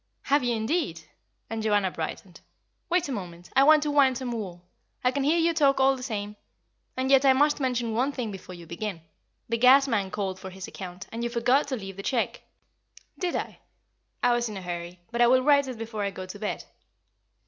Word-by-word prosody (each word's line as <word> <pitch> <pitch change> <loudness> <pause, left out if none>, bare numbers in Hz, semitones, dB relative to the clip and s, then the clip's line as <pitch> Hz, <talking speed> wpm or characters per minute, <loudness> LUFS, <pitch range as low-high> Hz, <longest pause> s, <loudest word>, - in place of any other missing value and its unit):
"Have 285 0 +2
you, 240 -1 +1
indeed?" 220 - -1 0.5
and 225 0 -4
Joanna 205 -3 +2
brightened. 170 +2 -6 0.5
"Wait 355 -2 +2
a - - -4
moment. 175 -6 -7
I 270 - +6
want 305 +1 +6
to 300 - -1
wind 270 -3 +4
some 255 -1 -4
wool. 185 -6 -6 0.4
I 250 - +3
can 280 +1 -1
hear 305 +5 +3
you 335 0 +3
talk 280 -4 +3
all 270 0 +4
the 260 - -9
same. 210 -4 -4 0.6
And 260 +1 0
yet 270 0 +6
I 270 -1 +6
must 295 +3 +3
mention 245 -4 -1
one 255 +5 +1
thing 245 -6 -4
before 185 -2 -9
you 170 -1 -11
begin. 170 +1 -5 0.5
The 230 0 -1
gas 265 +3 +7
man 205 -6 0
called 190 -1 -3
for 190 - -7
his 190 0 -8
account, 185 0 -8
and 230 +1 -4
you 235 - -1
forgot 245 +4 +2
to 270 - -2
leave 195 -4 -8
the - - -5
cheque.'' 235 +2 -1 0.8
"Did 360 -2 -1
I? - - -4 0.6
I 245 0 +4
was 240 -1 0
in 210 - -6
a - - -6
hurry. 175 0 -6
But 240 0 -1
I 240 - +7
will 255 +1 +4
write 280 -1 +4
it 255 -3 -6
before 220 -1 -5
I 200 - 0
go 185 -1 -7
to 185 +2 -9
bed." 210 - -3
235 Hz, 220 wpm, -27 LUFS, 195-270 Hz, 0.8 s, gas